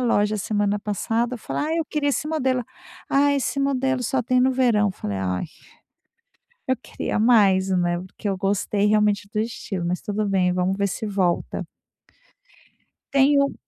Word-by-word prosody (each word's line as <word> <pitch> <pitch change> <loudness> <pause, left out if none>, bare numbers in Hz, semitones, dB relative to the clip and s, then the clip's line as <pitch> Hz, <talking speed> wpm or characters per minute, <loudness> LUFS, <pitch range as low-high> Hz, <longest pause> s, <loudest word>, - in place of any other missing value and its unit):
loja 215 -3 +2
semana 205 0 0
passada 225 +4 -1
falei: 240 - -3
"Ah, 320 +1 -1
eu 330 - 0
queria 295 -2 -1
esse 285 - -1
modelo". 260 -5 0 0.5
"Ah, 285 +1 +4
esse 275 +1 -1
modelo 265 -2 0
só 255 +2 0
tem 250 +1 +2
no 260 - +4
verão", 240 -5 +3
eu - - -4
falei: 100 - -4
"Ai, 90 -1 -2 1.2
eu 260 - +2
queria - - -4
mais, 200 -5 +4
né", 175 -2 +1
porque 190 +3 -7
eu 195 - -1
gostei 200 +1 0
realmente 210 -1 +2
do 215 - 0
estilo, 200 -5 -4
mas 180 +1 -1
tudo 210 +1 -2
bem 185 -2 +2
vamos 185 +1 0
ver 200 0 +1
se 215 +3 -4
volta. 190 -4 -1 1.5
Tem 280 +1 +5
um 280 0 +1
210 Hz, 165 wpm, -23 LUFS, 195-255 Hz, 1.5 s, Tem